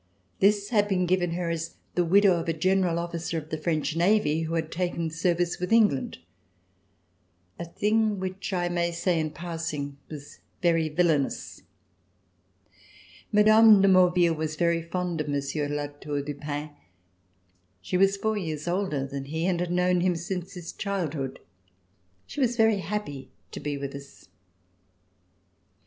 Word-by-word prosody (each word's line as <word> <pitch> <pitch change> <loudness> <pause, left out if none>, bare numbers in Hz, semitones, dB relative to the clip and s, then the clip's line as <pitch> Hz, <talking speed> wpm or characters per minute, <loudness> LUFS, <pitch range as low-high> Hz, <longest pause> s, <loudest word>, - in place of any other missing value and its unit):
This 205 +1 +3
had 205 -3 +3
been 185 -3 +1
given 175 -1 +1
her 170 -1 -2
as 165 0 -4 0.2
the 180 - +2
widow 190 +1 +4
of 165 - -4
a - - +2
general 185 +1 +1
officer 170 -1 -3
of 155 -1 -6
the 155 - -1
French 155 -1 -1
Marine, 165 -3 +2
who 165 +1 -3
had 160 -1 -2
taken 170 -2 -2
service 175 +1 0
with 180 +3 -3
England, 215 -12 +3 1.4
a 170 - -4
thing 210 +3 +1
which 190 +2 -4
I 175 -2 0
may 175 0 0
say 170 0 0
in 155 -1 -1
passing 155 -4 -5
was 145 -2 -10 0.2
very 165 -3 +2
villainous. 155 -3 0 1.7
Mme. 215 0 +7
de 195 - +4
Maurville 180 -2 +5
was 155 0 -3
very 170 0 +1
fond 175 -1 -3
of 150 - -5
Monsieur 145 +1 -2
de 145 - -3
La 145 0 -1
Tour 145 0 -5
du 145 +1 -4
Pin. 145 +1 -5 1.1
She 90 - -4
was 195 +2 +4
four 220 +2 0
years 155 -3 -4
older 175 -6 -1
than 140 0 -6
he 160 +4 -3
and 180 -2 +1
had 175 0 -2
known 180 0 +2
him 180 -1 +2
since 180 +2 -5
his 175 -2 -7
childhood. 160 -10 -3 0.9
She - - -8
was 245 -2 +1
very 220 -3 +4
happy 165 -9 -5 0.2
to - - -6
be 145 -1 -3
with 140 0 -5
us. 140 0 -12
170 Hz, 160 wpm, -27 LUFS, 155-185 Hz, 1.7 s, Mme